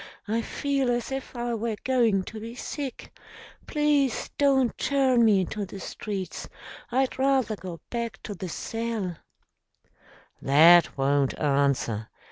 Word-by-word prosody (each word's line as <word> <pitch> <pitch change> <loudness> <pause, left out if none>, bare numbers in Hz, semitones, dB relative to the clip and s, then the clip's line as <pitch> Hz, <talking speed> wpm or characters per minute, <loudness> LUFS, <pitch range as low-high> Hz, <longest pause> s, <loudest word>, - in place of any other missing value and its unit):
"I 225 +2 0
feel 275 +1 -1
as 240 +1 -1
if 270 -1 -5
I 240 0 -2
were 225 0 -2
going 235 -7 +2
to 220 +3 -8
be 230 +2 -8
sick. 275 +1 -6 0.5
Please 295 -4 +1
don't 270 -4 +3
turn 265 -4 +2
me 210 -4 +5
into 205 +3 -3
the 195 0 -8
streets. 195 0 -5 0.4
I'd 260 +1 0
rather 265 -5 +2
go 180 -4 -8
back 235 -4 -3
to 210 - -5
the 185 -1 -6
cell 225 -3 -3 0.6
" - - -44 0.6
"That 165 +4 +6
won't 140 0 +1
answer. 140 -7 0
225 Hz, 135 wpm, -26 LUFS, 180-260 Hz, 0.6 s, That